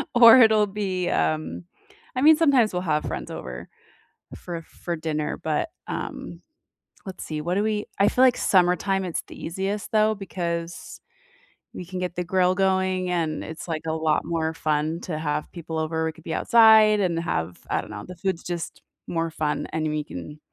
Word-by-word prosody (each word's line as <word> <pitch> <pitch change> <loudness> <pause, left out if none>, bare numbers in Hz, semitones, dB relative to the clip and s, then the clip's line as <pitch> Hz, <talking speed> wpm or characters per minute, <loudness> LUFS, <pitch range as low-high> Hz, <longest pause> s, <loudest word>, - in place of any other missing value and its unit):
or 235 +1 +9
it'll 220 -2 +5
be, 195 -3 -2
um, 80 +2 -1 0.5
I 255 - 0
mean, 310 +2 +8
sometimes 270 - +4
we'll 180 - -1
have 150 -4 0
friends 65 -5 -5
over 60 -1 -7 0.7
for 170 -2 -7
for 170 +1 -6
dinner, 155 -2 -3
but, 155 - -1 0.2
um, - - -6 0.7
let's 190 -1 -7
see. 155 -1 -4
What 175 +4 -1
do 205 - +1
we 215 -1 -1
I 200 - +5
feel 255 - +3
like 255 -2 +5
summertime, 190 +1 +2
it's 175 - -3
the - - -11
easiest 195 +4 -3
though 215 0 +3
because 170 -4 -5 0.7
we - - -6
can 185 +1 -6
get 180 -1 -4
the 180 - -1
grill 180 0 +2
going, 190 -1 +1
and 165 -3 -1
it's 160 - -8
like 160 -2 -3
a - - 0
lot 160 -1 +1
more 160 -1 -1
fun 155 +1 -1
to 155 -4 -4
have 150 -1 -2
people 165 -2 -6
over. 160 0 -1
We 160 - -1
could - - -18
be 160 - -3
outside 220 -2 +6
and 175 -4 0
have 85 - -3
I - - +1
don't - - -12
know. 105 -1 -7
The 180 - -9
food's 185 -1 -2
just 175 -2 -5 0.3
more 165 -1 -1
fun, 155 -1 -2
and 155 0 -1
we 150 0 -2
can 145 - -8
175 Hz, 185 wpm, -24 LUFS, 155-195 Hz, 0.7 s, or